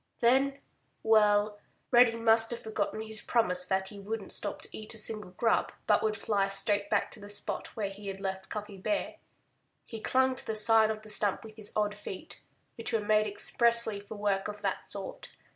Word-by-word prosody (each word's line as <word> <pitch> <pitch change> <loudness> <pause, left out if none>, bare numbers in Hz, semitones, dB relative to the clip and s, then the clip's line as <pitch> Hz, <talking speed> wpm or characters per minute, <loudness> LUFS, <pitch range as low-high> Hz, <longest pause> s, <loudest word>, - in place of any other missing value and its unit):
Then—well! 220 -5 +1 0.3
Reddy 240 -2 +6
must 225 0 +4
have 240 - -5
forgotten 220 0 -3
his 220 -1 -4
promise 180 -6 +1
that 190 0 0
he 205 - -10
wouldn't 205 0 -5
stop - - -5
to - - -9
eat 215 +1 -7
a - - -9
single 210 -2 -3
grub, 225 +5 +1
but - - +3
would 215 -1 0
fly 200 -3 0
straight 205 +1 0
back - - 0
to - - -6
the 205 0 -11
spot 205 0 -1
where 200 -3 -2
he 200 +1 -10
had 195 0 -5
left 190 -1 -5
Cuffy 210 -1 -6
Bear. 300 +11 -2 0.7
He 225 -2 -8
clung 260 +2 +2
to - - -6
the 220 - -2
side 220 0 +6
of 215 0 -4
the 215 - -10
stump 205 -2 +1
with 220 -1 -12
his 215 -2 -6
odd 210 -1 +1
feet, 205 - -9 0.4
which 230 +1 -4
were 225 - +1
made 215 0 +2
expressly 230 +1 +4
for 205 +2 -10
work 200 -2 -1
of 210 0 -7
that - - -3
sort. - - -7
215 Hz, 195 wpm, -30 LUFS, 205-225 Hz, 0.7 s, Reddy